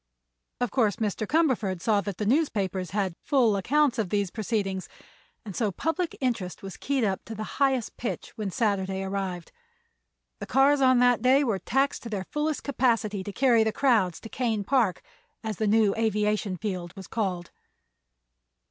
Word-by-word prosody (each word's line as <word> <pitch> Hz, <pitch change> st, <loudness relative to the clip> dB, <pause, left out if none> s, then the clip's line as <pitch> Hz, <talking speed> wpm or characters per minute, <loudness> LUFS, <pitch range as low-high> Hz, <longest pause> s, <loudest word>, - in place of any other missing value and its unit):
Of 245 Hz, -3 st, -1 dB
course 220 Hz, -7 st, +2 dB
Mr. 215 Hz, -1 st, -2 dB
Cumberford 250 Hz, -, +1 dB
saw 205 Hz, +2 st, +2 dB
that 200 Hz, -1 st, -5 dB
the 210 Hz, -, -2 dB
newspapers 200 Hz, -, 0 dB
had 190 Hz, 0 st, -1 dB
full 245 Hz, -7 st, +3 dB
accounts 265 Hz, +5 st, +2 dB
of 205 Hz, -5 st, -1 dB
these 200 Hz, -2 st, 0 dB
proceedings, 200 Hz, -4 st, -2 dB, 0.6 s
and 200 Hz, -4 st, -7 dB
so 215 Hz, -4 st, 0 dB
public 325 Hz, -, -2 dB
interest 225 Hz, -10 st, -2 dB
was 195 Hz, -1 st, -7 dB
keyed 275 Hz, -3 st, -1 dB
up 195 Hz, -3 st, -1 dB
to 225 Hz, -, -7 dB
the 215 Hz, -, -4 dB, 0.2 s
highest 265 Hz, -4 st, +1 dB
pitch 235 Hz, -, -4 dB
when 210 Hz, -3 st, -3 dB
Saturday 195 Hz, -2 st, -1 dB
arrived. 190 Hz, -3 st, -4 dB, 0.9 s
The -, -, -6 dB
cars 275 Hz, +1 st, +4 dB
on 255 Hz, -1 st, +5 dB
that 245 Hz, -2 st, +4 dB
day 260 Hz, +4 st, +4 dB
were 225 Hz, -7 st, 0 dB
taxed 270 Hz, +9 st, 0 dB
to 235 Hz, -, -7 dB
their 195 Hz, -3 st, -3 dB
fullest 300 Hz, 0 st, -1 dB
capacity 230 Hz, -7 st, 0 dB
to 205 Hz, -, -6 dB
carry 235 Hz, 0 st, +4 dB
the 220 Hz, -, +1 dB
crowds 215 Hz, -10 st, +2 dB
to -, -, -8 dB
Kane 225 Hz, -5 st, -1 dB
Park, 230 Hz, -5 st, +1 dB, 0.4 s
as 215 Hz, -3 st, -3 dB
the 215 Hz, -, 0 dB
new 215 Hz, -1 st, +4 dB
aviation 210 Hz, -3 st, 0 dB
field 180 Hz, -4 st, -4 dB
was 195 Hz, -1 st, -9 dB
called. 185 Hz, -6 st, -3 dB
215 Hz, 170 wpm, -27 LUFS, 195-255 Hz, 0.9 s, on